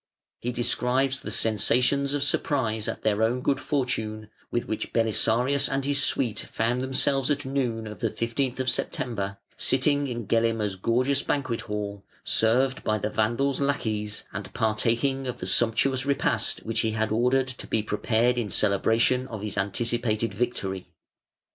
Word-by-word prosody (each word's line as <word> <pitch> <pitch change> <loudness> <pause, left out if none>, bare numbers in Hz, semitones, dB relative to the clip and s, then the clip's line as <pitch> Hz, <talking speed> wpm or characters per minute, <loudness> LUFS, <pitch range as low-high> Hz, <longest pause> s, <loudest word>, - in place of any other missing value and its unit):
He 120 - -2
describes 130 +2 +1
the - - -7
sensations 125 +6 +2
of 145 - +1
surprise 115 -6 0
at - - -4
their 110 0 +1
own 120 +3 +2
good 140 - +1
fortune, 110 -7 -2 0.2
with 120 - -1
which 110 - -4
Belisarius 120 +4 +2
and 135 0 -1
his 140 -1 +2
suite 120 -5 +1
found 120 +3 -1
themselves 135 +1 +1
at 145 -2 0
noon 125 -5 -1
of 105 -3 -8
the - - 0
15 120 +2 -2
th 130 -1 -3
September, 100 -6 -1 0.2
sitting 145 +2 +2
in 120 -3 -4
Gelimer's 115 -2 +1
gorgeous 125 +8 +1
banquet 130 -5 -1
hall, 105 -2 -5 0.2
served 130 +4 +2
by 110 - +1
the 105 +1 -3
Vandal's 120 +7 +1
lackeys 110 -7 -1
and 100 -2 -6
partaking 120 +4 0
of 125 - -3
the - - -4
sumptuous 125 +3 +2
repast 135 -5 0
which 115 0 -1
he 110 -1 +1
had 110 0 -1
ordered 125 +4 +2
to 130 - -7
be 110 - 0
prepared 115 +3 +1
in 110 -4 -2
celebration 115 +6 +2
of 110 -5 -7
his 105 -2 -2
anticipated 115 +2 0
victory. 95 -4 -2
120 Hz, 155 wpm, -26 LUFS, 110-130 Hz, 0.2 s, sensations